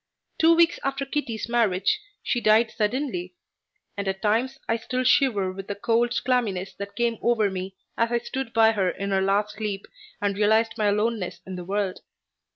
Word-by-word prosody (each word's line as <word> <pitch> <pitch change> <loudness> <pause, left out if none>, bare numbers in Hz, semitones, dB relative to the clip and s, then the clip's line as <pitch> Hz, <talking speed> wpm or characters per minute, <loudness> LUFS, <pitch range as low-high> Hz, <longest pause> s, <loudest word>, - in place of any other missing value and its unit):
Two 330 +1 +6
weeks 335 0 +4
after 275 0 -1
Kitty's 255 -7 -3
marriage 235 - +2 0.2
she 240 - 0
died 220 +1 +4
suddenly, 210 -6 -2 0.6
and 200 -1 -4
at 190 +1 -3
times 235 +6 +1
I 225 - +1
still 255 +3 -2
shiver 240 -8 +3
with 195 +1 -8
the 205 - -3
cold 235 +3 +1
clamminess 215 -7 0
that 200 0 -6
came 235 0 0
over 220 -4 +2
me 190 0 -5 0.2
as 230 0 +2
I 240 - +3
stood 240 +1 -4
by 225 -1 +5
her 195 -4 +1
in 200 +2 -4
her 190 0 +2
last 200 +2 0
sleep 205 -2 -3 0.3
and 200 -1 0
realized 220 +2 +3
my 215 -2 +1
aloneness 210 -1 -1
in 190 - -6
the 180 -1 -7
world. 195 0 -2
215 Hz, 180 wpm, -25 LUFS, 195-240 Hz, 0.6 s, Two